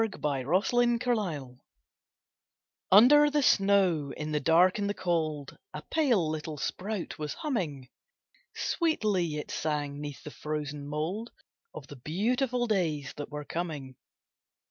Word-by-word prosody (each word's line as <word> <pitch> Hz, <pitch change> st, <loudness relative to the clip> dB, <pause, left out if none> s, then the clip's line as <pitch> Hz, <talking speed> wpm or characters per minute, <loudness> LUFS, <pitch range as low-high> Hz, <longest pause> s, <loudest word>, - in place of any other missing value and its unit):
THE 220 Hz, -3 st, -1 dB
TENDRIL'S 150 Hz, -, 0 dB
FATE 225 Hz, -, 0 dB, 1.3 s
Under 290 Hz, +9 st, +8 dB
the 295 Hz, -1 st, +1 dB
snow, 195 Hz, -, +3 dB
in 155 Hz, 0 st, -4 dB
the 150 Hz, -, +1 dB
dark 175 Hz, +6 st, +4 dB
and 200 Hz, 0 st, -1 dB
the 205 Hz, -, -2 dB
cold, 155 Hz, -5 st, -2 dB, 0.2 s
A -, -, -6 dB
pale 245 Hz, -, +2 dB
little 155 Hz, 0 st, -4 dB
sprout 190 Hz, +5 st, -4 dB
was 150 Hz, -1 st, -4 dB
humming; 165 Hz, -, -3 dB, 0.7 s
Sweetly 210 Hz, -, 0 dB
it 150 Hz, -, -5 dB
sang, 145 Hz, -2 st, -2 dB
'neath 145 Hz, -2 st, -7 dB
the 150 Hz, -, -8 dB
frozen 150 Hz, -2 st, -5 dB
mould, 165 Hz, +10 st, -3 dB, 0.5 s
Of 150 Hz, -, -8 dB
the 145 Hz, -, -11 dB
beautiful 240 Hz, -, 0 dB
days 160 Hz, -, -1 dB
that 145 Hz, -, -6 dB
were 150 Hz, 0 st, -6 dB
coming. 150 Hz, -7 st, -5 dB
165 Hz, 130 wpm, -29 LUFS, 150-215 Hz, 1.3 s, Under